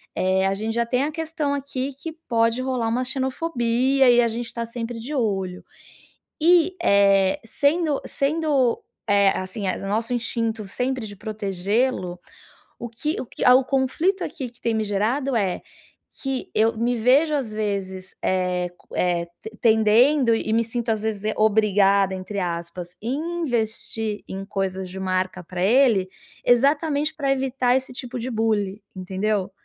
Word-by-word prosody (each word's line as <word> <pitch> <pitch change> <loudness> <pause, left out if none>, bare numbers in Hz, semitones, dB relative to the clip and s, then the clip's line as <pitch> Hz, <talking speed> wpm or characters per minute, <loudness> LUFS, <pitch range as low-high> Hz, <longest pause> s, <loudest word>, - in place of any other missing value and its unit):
é 190 +1 +2
a 195 - +1
gente 220 +3 -3
já 235 0 +1
tem 250 +3 0
a 300 - -1
questão 315 -2 -2
aqui 275 -1 -3
que 325 +1 -6 0.2
pode 230 +1 +2
rolar 255 -3 -1
uma 245 +3 0
xenofobia 260 -1 +1
e 240 0 +6
a 235 - +3
gente 235 +1 -4
está 230 0 -4
sempre 230 0 -5
de 250 +7 -6
olho. 190 -7 -2 0.8
E, 350 +2 +4
eh, 200 - +4
sendo 290 +5 +1
sendo, 280 -4 +1 0.3
eh, 200 -1 +5
assim 185 +3 -5
o 195 +1 -3
nosso 225 +4 -1
instinto 230 -2 -2
sempre 250 +3 -2
de 205 -1 -9
protegê-lo, 200 -1 -1 0.6
o 240 - -5
que 295 +8 -3
o - - -6
que - - -6
há 250 - +8
o 265 - +5
conflito 300 +9 +1
aqui 265 -7 -5
que 240 - -25
tem 230 - 0
me 220 - 0
gerado 235 +7 0
é: 195 -5 0 0.6
que 270 -2 -3
eu 225 +1 +2
me 240 +2 +1
vejo 270 +7 +4
às 250 -7 -2
vezes, 195 -3 -4
eh, 180 -1 0
co - - -27
eh, 175 -1 0 0.3
tendendo 230 +4 +4
e 220 -1 -2
me 230 +1 +3
sinto, 235 0 -3
às 220 -1 0
vezes, 215 -2 -3
eh, 215 - 0
"obrigada" 200 -2 +3
entre 190 +2 -5
aspas 175 0 -5
em 250 +6 -2 0.2
investir 225 -5 -1
em 195 +1 -6
coisas 190 -2 -3
de 190 +1 -7
marca 185 -1 -2
pra 180 +1 -6
ele, 225 -3 +4 0.4
exatamente 285 +4 +2
para 280 -3 0
evitar 260 -2 +1
esse 265 0 -5
tipo 250 -1 -6
de 250 +3 -4
bullying, 215 -3 0 0.2
entendeu. 190 +1 -2
230 Hz, 160 wpm, -23 LUFS, 200-260 Hz, 0.8 s, há